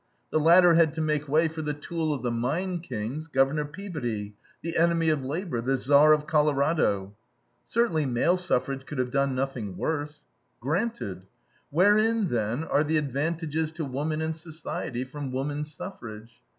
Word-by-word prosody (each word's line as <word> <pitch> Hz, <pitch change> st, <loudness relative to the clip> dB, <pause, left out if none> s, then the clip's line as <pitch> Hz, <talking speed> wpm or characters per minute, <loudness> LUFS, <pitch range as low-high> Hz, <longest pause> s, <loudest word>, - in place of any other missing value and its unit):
The -, -, +2 dB
latter 170 Hz, +2 st, +7 dB
had 165 Hz, -2 st, +4 dB
to -, -, -4 dB
make 150 Hz, -1 st, 0 dB
way 160 Hz, +3 st, +4 dB
for 160 Hz, 0 st, -5 dB
the 150 Hz, -1 st, -2 dB
tool 160 Hz, +1 st, -2 dB
of 140 Hz, -3 st, -3 dB
the 120 Hz, -, 0 dB
mine 170 Hz, +10 st, -1 dB
kings, 135 Hz, +1 st, -5 dB
Governor 140 Hz, +1 st, +2 dB
Peabody, 145 Hz, -, -5 dB, 0.3 s
the 165 Hz, 0 st, -4 dB
enemy 165 Hz, -1 st, +3 dB
of 150 Hz, -3 st, +1 dB
labor, 150 Hz, -2 st, -3 dB
the 135 Hz, +3 st, +1 dB
Tsar 145 Hz, +4 st, +5 dB
of 150 Hz, -1 st, +3 dB
Colorado. 145 Hz, -, +1 dB, 0.5 s
"Certainly 170 Hz, -, +1 dB
male 130 Hz, +8 st, +2 dB
suffrage 135 Hz, -6 st, -1 dB
could 150 Hz, -, -6 dB
have 125 Hz, -1 st, -1 dB
done 140 Hz, -1 st, +1 dB
nothing 125 Hz, -8 st, -3 dB
worse." 150 Hz, -1 st, -3 dB, 0.4 s
Granted. 150 Hz, -, -2 dB, 0.4 s
Wherein, 210 Hz, +5 st, +3 dB
then, 115 Hz, +4 st, -1 dB
are 150 Hz, -2 st, +2 dB
the 155 Hz, +1 st, +1 dB
advantages 155 Hz, +2 st, -1 dB
to 160 Hz, -1 st, -4 dB
woman 150 Hz, +4 st, -2 dB
and 160 Hz, 0 st, -2 dB
society 155 Hz, -5 st, -5 dB
from 135 Hz, +1 st, -6 dB
woman 145 Hz, +3 st, -2 dB
suffrage? 120 Hz, -, -8 dB
150 Hz, 160 wpm, -27 LUFS, 130-165 Hz, 0.5 s, latter